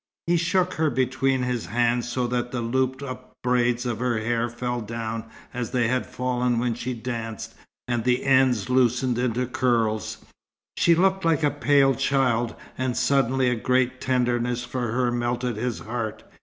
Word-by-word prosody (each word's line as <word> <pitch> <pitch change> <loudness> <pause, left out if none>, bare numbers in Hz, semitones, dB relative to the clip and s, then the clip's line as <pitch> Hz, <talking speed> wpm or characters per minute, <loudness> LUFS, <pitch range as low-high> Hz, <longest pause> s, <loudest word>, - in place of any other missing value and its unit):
He 175 - +2
shook 180 +2 +1
her 160 -1 +1
between 130 0 +1
his 125 -2 -2
hands, 120 +1 +1
so 125 +1 -1
that 120 0 -2
the 125 - -2
looped 130 +3 -1
up 130 -1 -8
braids 125 0 +1
of 120 -3 -2
her 125 -2 0
hair 115 +2 0
fell 120 +1 -3
down, 115 0 -4 0.3
as 120 -2 -3
they 120 -3 +1
had 130 0 0
fallen 125 -1 -1
when 120 0 0
she 120 +2 -4
danced, 115 -2 -5 0.3
and 120 -2 -1
the 125 +1 +1
ends 130 -6 +3
loosened 125 -1 +2
into 125 0 0
curls. 115 -3 0 0.5
She 170 - +4
looked 190 +2 +2
like 165 -2 +2
a 145 - +3
pale 135 +1 +3
child, 130 -4 +1 0.2
and 130 -1 -1
suddenly 130 0 +2
a - - +1
great 130 +2 +1
tenderness 125 -1 0
for 125 -2 -3
her 125 0 +1
melted 120 -1 -1
his 120 +1 -2
heart. 110 -1 -4
125 Hz, 170 wpm, -25 LUFS, 120-130 Hz, 0.5 s, She